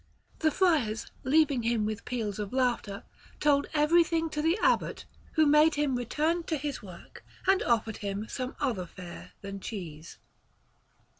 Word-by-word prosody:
The 315 - +3
friars, 290 - +1
leaving 285 -2 +3
him 230 -2 +1
with 215 -1 -4
peals 220 -5 -3
of 205 -2 -4
laughter, 240 -6 0 0.4
told 285 -1 +3
everything 325 +1 +3
to 300 - -1
the 325 +5 +2
Abbot, - - +1 0.3
who 315 -1 +4
made 300 +2 +5
him 290 -3 +1
return 305 +8 0
to 315 - -1
his 285 0 -4
work, 180 -4 -12 0.2
and 385 0 +4
ordered 225 -2 +1
him 200 +1 -4
some 255 +1 -4
other 225 -11 -1
fare 165 - -10
than 200 0 -6
cheese. 170 -6 -7
250 Hz, 150 wpm, -29 LUFS, 210-305 Hz, 0.4 s, made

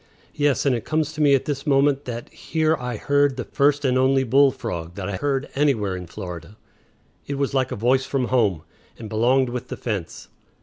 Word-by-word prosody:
Yes, 145 -1 +1
and 135 -3 +3
it 115 - -4
comes 155 -1 -1
to 155 - -4
me 145 -2 +5
at 135 - -1
this 145 +1 -4
moment 140 0 +3
that 120 -1 -5
here 160 0 0
I 125 -4 -5
heard 145 +1 +2
the 125 - -2
first 145 +3 +1
and 130 -1 +2
only 135 +1 +3
bull 135 +3 +5
frog 90 -10 -6
that 95 -1 -5
I 95 - -3
heard 140 +1 -1
anywhere 120 -10 +1
in 90 -1 -7
Florida. 90 +1 -8 0.7
It 140 - -3
was 140 0 -1
like 130 -2 0
a - - -2
voice 130 +4 +1
from 130 -3 -1
home, 105 -11 +1 0.3
and 110 - -8
belonged 120 +4 +2
with 120 0 -5
the - - -6
fence. 100 -8 -5
130 Hz, 210 wpm, -23 LUFS, 110-140 Hz, 0.7 s, me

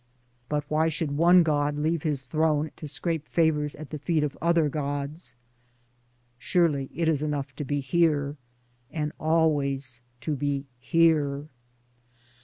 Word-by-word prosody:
But 150 -1 0
why 155 +2 +2
should 155 -2 -2
one 175 +3 +6
god 145 -2 +1
leave 160 +2 0
his 145 -4 -1
throne 155 +2 +1
to 155 - -7
scrape 160 +1 -2
favors 150 -3 +1
at 155 -1 -10
the 150 - -4
feet 155 +1 +1
of 145 -2 -2
other 170 -2 +3
gods? 145 +2 -3 1.0
Surely 145 -2 +1
it 165 +1 0
is 155 -3 +2
enough 145 -3 -3
to - - -3
be 145 +1 -1
here 145 -1 +1 0.3
— 120 0 -40
and 150 -2 -2
always 140 -6 +1 0.2
to 150 +5 -1
be 140 0 -1
Here. 150 0 +2
150 Hz, 145 wpm, -27 LUFS, 140-160 Hz, 1.0 s, one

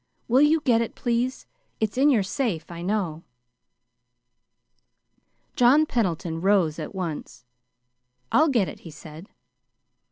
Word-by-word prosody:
Will 255 +4 +4
you 305 +2 +4
get 235 -6 +2
it, 230 - -4
please? 245 +2 -2 0.3
It's 220 0 -1
in 275 +3 +4
your 230 -8 +3
safe, 210 - -2
you 170 0 -7
know." 180 -5 -2 2.3
John 275 +4 +5
Pendleton 170 - -2
rose 185 -5 +2
at - - -7
once. 165 -8 -6 0.9
"I'll 310 +2 +4
get 230 -9 +2
it," - - -9
he 165 - -11
said. 155 +3 -12
210 Hz, 125 wpm, -24 LUFS, 170-255 Hz, 2.3 s, John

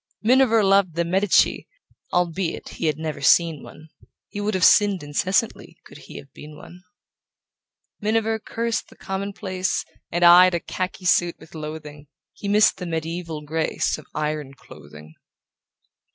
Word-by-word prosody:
Miniver 230 -2 +4
loved 195 -3 +3
the 170 0 0
Medici, 190 +3 +2 0.4
Albeit 175 0 -2
he 165 - -4
had 155 -1 0
never 155 -1 -5
seen 165 -4 +3
one; 155 +1 -14 0.4
He 205 - -6
would 210 0 -1
have 185 - -1
sinned 205 -5 +4
incessantly 185 +9 -2
Could - - -14
he - - -12
have 70 0 -13
been 150 0 -12
one. 175 +4 -14 1.2
Miniver 220 +1 0
cursed 230 +1 -3
the - - -17
commonplace 190 -1 -3 0.3
And 175 0 +2
eyed 180 +1 +7
a - - 0
khaki 185 +2 -5
suit 175 -1 +2
with 160 - -17
loathing: 150 -2 -8 0.3
He 200 - -8
missed 210 +2 +4
the 180 -2 -6
medieval 165 -1 -5
grace 155 +1 -2
Of 155 - -15
iron 150 -2 -3
clothing. 75 - -15
175 Hz, 145 wpm, -22 LUFS, 155-200 Hz, 1.2 s, eyed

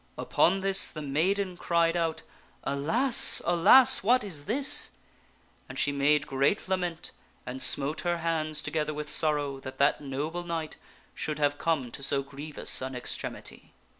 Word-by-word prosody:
Upon 190 +3 0
this 195 0 +6
the 155 - -8
maiden 180 +7 -2
cried 170 -1 0
out, 165 -2 -2 0.4
"Alas! 165 - +4
alas! 175 +9 +6
what 245 +5 +2
is 155 -8 -6
this! 270 +6 +2 0.4
" - - -36
and - - -9
she 145 - 0
made 145 +1 +1
great 140 +10 -1
lament 180 -3 -4 0.3
and 130 +1 -7
smote 140 +4 0
her 175 -1 -2
hands 155 -2 -3
together 155 -1 -3
with 150 0 -6
sorrow 145 -3 +1
that 130 0 -10
that 140 +2 +1
noble 150 +5 -5
knight 165 -2 -6 0.4
should 155 -2 -4
have 145 -1 -1
come 145 -8 -2
to - - -8
so 140 0 0
grievous 140 +1 -3
an 130 0 -6
extremity. 125 - -7
155 Hz, 155 wpm, -27 LUFS, 140-175 Hz, 0.4 s, this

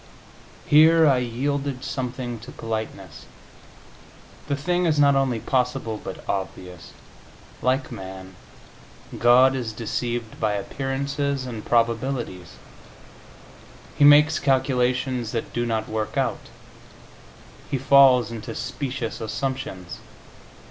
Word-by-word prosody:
Here 160 +2 +6
I 135 -4 +4
yielded 135 +2 -2
something 125 -3 -4
to 120 +4 -11
politeness; 110 -7 -6 1.2
the 140 - 0
thing 175 +5 0
is 155 -2 +1
not 140 -1 +5
only 135 -4 +1
possible, 125 -3 -1
but - - -8
obvious. 90 -3 -5 0.7
Like 130 +2 0
man, 95 0 -9 0.8
God 125 +2 +5
is 120 -4 -3
deceived 120 0 -4
by 110 -2 +1
appearances 135 +5 -2
and 115 -4 -6
probabilities; 115 - -1 1.4
He - - +2
makes 150 +2 +7
calculations 130 -3 0
that 115 - -4
do 120 0 -1
not 110 -1 -1
work 110 -1 -3
out; - - -2 1.2
He 140 - -1
falls 130 -3 +5
into 115 -2 -7
specious 130 -5 -4
assumptions. 110 -6 -4
125 Hz, 105 wpm, -24 LUFS, 110-135 Hz, 1.4 s, makes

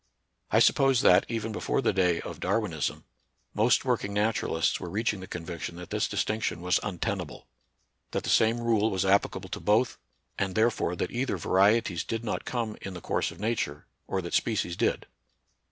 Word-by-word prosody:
I - - +3
suppose 135 -3 +4
that, - - +5
even 110 -1 -2
before 110 - -1
the 135 - +1
day 90 -3 +2
of - - -8
Darwin 105 -6 0
ism, 75 -3 -2 0.5
most 115 +5 +3
working 115 -5 -1
naturahsts 105 -6 +1
were 90 - -6
reaching 105 +2 -1
the 95 - -8
conviction 85 0 -6
that 90 0 -10
this - - 0
distinction 110 -5 -1
was 90 0 +2
untenable; 95 -4 -4 0.6
that - - -3
the - - -1
same 115 +1 +3
rule 110 -2 +2
was 95 -3 -1
applicable 100 +1 +1
to - - -4
both; 110 +4 +2 0.4
and 95 -1 -1
therefore 110 -5 +1
that 90 - -3
either 125 -4 -1
varieties 95 0 +2
did 115 0 -4
not 110 - -3
come 115 -4 -3
in 95 -2 -6
the - - -6
course - - -1
of - - -12
nature, 105 -9 -2 0.2
or 95 -1 -2
that 85 - -6
species 100 -6 0
did. - - 0
105 Hz, 180 wpm, -28 LUFS, 90-115 Hz, 0.6 s, that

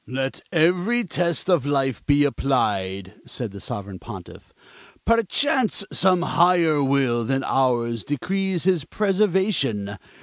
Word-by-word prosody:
"Let 135 +1 -3
every 180 +9 +2
test 170 -3 -1
of 175 -7 +3
life 135 -3 -1
be 145 0 +4
applied," 100 -9 -1
said 120 -5 -5
the 100 -1 -10
Sovereign 100 -2 -6
Pontiff. - - -11 0.5
"Perchance 230 - +2
some 185 -2 +3
higher 170 -5 +3
will 135 -4 +1
than 135 +3 -1
ours 120 -4 0
decrees 190 +5 -2
his 180 -4 +2
preservation. 185 - 0
145 Hz, 115 wpm, -23 LUFS, 120-185 Hz, 0.5 s, be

